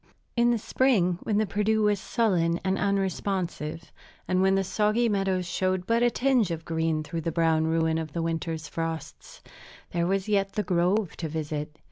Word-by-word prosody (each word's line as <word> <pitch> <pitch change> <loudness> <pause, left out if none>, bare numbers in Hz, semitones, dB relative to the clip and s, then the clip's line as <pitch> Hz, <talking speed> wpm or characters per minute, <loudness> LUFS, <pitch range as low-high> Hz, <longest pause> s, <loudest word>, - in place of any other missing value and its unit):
In 240 0 +4
the 240 - +3
spring, 200 -7 +2
when 210 - 0
the 215 - +2
Perdu 215 +2 +1
was 210 -1 +2
sullen 180 -8 +1
and 190 0 +1
unresponsive, 190 -5 -2 0.4
and 185 0 +2
when 190 0 +4
the 195 - +2
soggy 215 +4 +1
meadows 195 -3 0
showed 185 +1 -1
but 230 +3 +2
a 240 - +5
tinge 245 -4 +2
of 165 -1 -4
green 160 -1 0
through 165 +2 -4
the 165 - -2
brown 160 -1 +2
ruin 160 0 +1
of 155 -2 -6
the 170 - -2
winter's 165 -1 -3
frosts, 165 -1 -6 0.5
there 170 0 0
was 195 +1 0
yet 195 -2 +1
the 210 - -1
grove 180 +2 +1
to 160 - -4
visit. 150 0 -4
185 Hz, 180 wpm, -27 LUFS, 165-205 Hz, 0.5 s, a